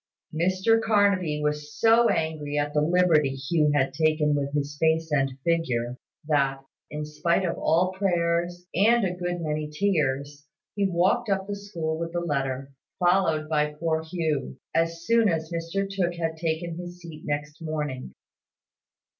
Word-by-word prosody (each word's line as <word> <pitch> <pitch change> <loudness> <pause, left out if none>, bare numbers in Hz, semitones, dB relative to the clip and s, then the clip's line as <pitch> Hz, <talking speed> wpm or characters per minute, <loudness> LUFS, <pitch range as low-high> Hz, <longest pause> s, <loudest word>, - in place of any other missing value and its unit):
Mr 185 +7 +2
Carnaby 200 -8 +2
was 150 0 -3
so 230 +1 +5
angry 155 -2 -1
at 145 0 0
the 150 - +2
liberty 155 -4 +3
Hugh 150 +3 +1
had 135 -2 +1
taken 155 0 +2
with 140 -1 -1
his 145 0 -2
face 160 0 +2
and 135 -2 +1
figure, 125 -8 0 0.3
that, 140 -3 +1 0.3
in 150 0 -4
spite 170 +5 0
of 170 - -1
all 175 +4 +2
prayers, 175 -2 0
and 225 +4 +4
a 180 - 0
good 175 -1 -3
many 155 -1 -2
tears, 145 -5 -1 0.3
he 200 -1 +1
walked 190 +7 +2
up 195 -1 0
the 205 0 -4
school 170 -6 -4
with 165 0 -4
the 175 - 0
letter, 135 -4 -2 0.3
followed 175 -4 +2
by 150 -1 0
poor 160 0 0
Hugh, 160 - -2 0.2
as 165 0 0
soon 230 0 +4
as 160 -1 -2
Mr 170 +4 -2
Tooke 185 -3 -1
had 165 -1 -2
taken 165 +1 -2
his 175 0 -8
seat 165 -3 -10
next 150 +1 -4
morning. 150 - -4
160 Hz, 155 wpm, -26 LUFS, 150-180 Hz, 0.3 s, so